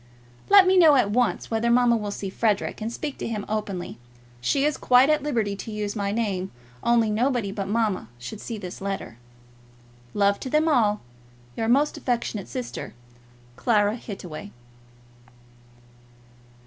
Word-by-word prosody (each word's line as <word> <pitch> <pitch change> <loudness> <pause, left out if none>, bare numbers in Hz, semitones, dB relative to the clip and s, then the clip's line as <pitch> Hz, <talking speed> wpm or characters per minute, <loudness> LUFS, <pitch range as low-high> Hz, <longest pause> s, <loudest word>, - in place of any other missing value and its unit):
Let 395 -1 +8
me 375 0 +4
know 320 -5 +7
at 225 -6 +3
once 245 +1 0
whether 225 +1 +1
mamma 240 0 +4
will 210 -2 -3
see 200 -1 -5
Frederic, 210 0 0
and 220 +2 -3
speak 290 +3 -5
to - - -3
him 215 -3 -4
openly. 190 - -4 0.4
She 275 - +1
is 300 -1 +1
quite 255 +4 +4
at 305 -1 +2
liberty 230 -8 -1
to 220 - -7
use 210 0 -3
my 200 -2 -1
name; 200 -4 -1 0.3
only 230 -2 +3
nobody 235 -2 0
but 195 -1 -4
mamma 210 - 0
should 200 - -8
see 230 - -5
this 185 -3 -8
letter. 195 - -5 1.0
Love 200 -1 +2
to 260 - -5
them 305 +3 +2
all, 215 -9 +2 0.5
Your 225 - -2
most 280 +5 +2
affectionate 235 -5 -2
sister, 250 - -6 0.6
CLARA 210 -3 +2
HITTAWAY. 195 -4 -8
220 Hz, 150 wpm, -25 LUFS, 200-250 Hz, 1.0 s, Let